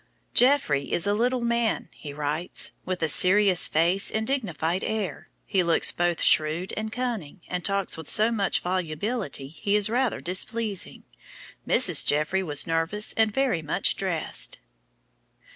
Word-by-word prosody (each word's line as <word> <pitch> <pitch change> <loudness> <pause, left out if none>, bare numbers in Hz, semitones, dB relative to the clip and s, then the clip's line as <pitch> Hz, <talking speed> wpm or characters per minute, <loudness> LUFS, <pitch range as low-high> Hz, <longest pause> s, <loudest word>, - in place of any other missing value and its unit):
"Jeffrey 240 - +2
is 175 - 0
a 205 - +1
little 245 +4 0
man," 235 -1 -1
he 145 - -9
writes, 150 +4 -2
"with 185 -2 -3
a - - +2
serious 185 +3 +5
face 175 +5 +1
and 220 0 -2
dignified 185 - -2
air. 205 -9 -4 0.2
He 190 - +1
looks 170 -2 +2
both 175 -1 -1
shrewd 155 +4 +2
and 215 0 -4
cunning, 225 - -5
and 180 -1 -4
talks 200 -3 -1
with 160 - -6
so 215 +2 +3
much 205 -4 0
volubility 180 - -3
he 200 +7 -2
is 210 +1 +1
rather 250 -1 0
displeasing.... 205 +3 -3 0.6
Mrs. 180 - +4
Jeffrey 155 +6 0
was 150 -6 +1
nervous 165 +6 +1
and 220 -1 +1
very 255 -7 0
much 150 - 0
dressed." - - -2
190 Hz, 145 wpm, -25 LUFS, 165-220 Hz, 0.6 s, serious